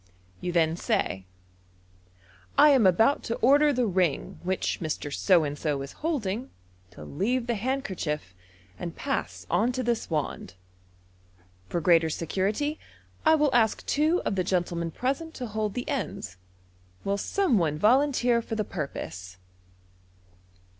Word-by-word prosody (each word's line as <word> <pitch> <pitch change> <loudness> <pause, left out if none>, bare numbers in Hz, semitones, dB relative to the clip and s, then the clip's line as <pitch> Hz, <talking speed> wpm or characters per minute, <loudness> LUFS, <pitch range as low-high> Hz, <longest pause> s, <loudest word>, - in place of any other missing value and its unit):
You 180 - -3
then 165 -2 +2
say, 95 - -1 0.6
" 90 0 -30
I 300 - +8
am 260 -8 +5
about 225 +10 +4
to 230 - -1
order 290 +4 +5
the 250 -3 +1
ring 185 -7 0
which 185 +1 -1
Mr. 155 -3 -4
So 180 -1 +4
and 145 -1 -3
so 145 -2 -2
is 135 - -8
holding, 250 - -2 0.4
to 85 - -12
leave 230 - -1
the 240 - 0
handkerchief, 195 - -3 0.5
and 170 -2 -5
pass 275 -1 -3
on 235 +4 +2
to 255 +1 -2
this 235 -2 -1
wand. 150 - -3 1.1
For 175 - -1
greater 165 -1 +4
security, 200 - -1 0.5
I 320 - +7
will 300 -3 +2
ask 225 -3 +2
two 310 +5 +2
of - - 0
the 185 -2 0
gentlemen 175 -2 -1
present 275 - -3
to 250 - -5
hold 215 -2 -3
the 245 - -3
enda 220 - -3 0.7
Will 200 +1 -1
some 330 - +1
one 155 -3 0
volunteer 245 - +3
for 225 -1 -5
the 215 -1 -1
purpose 95 - -6
195 Hz, 145 wpm, -27 LUFS, 155-250 Hz, 1.1 s, I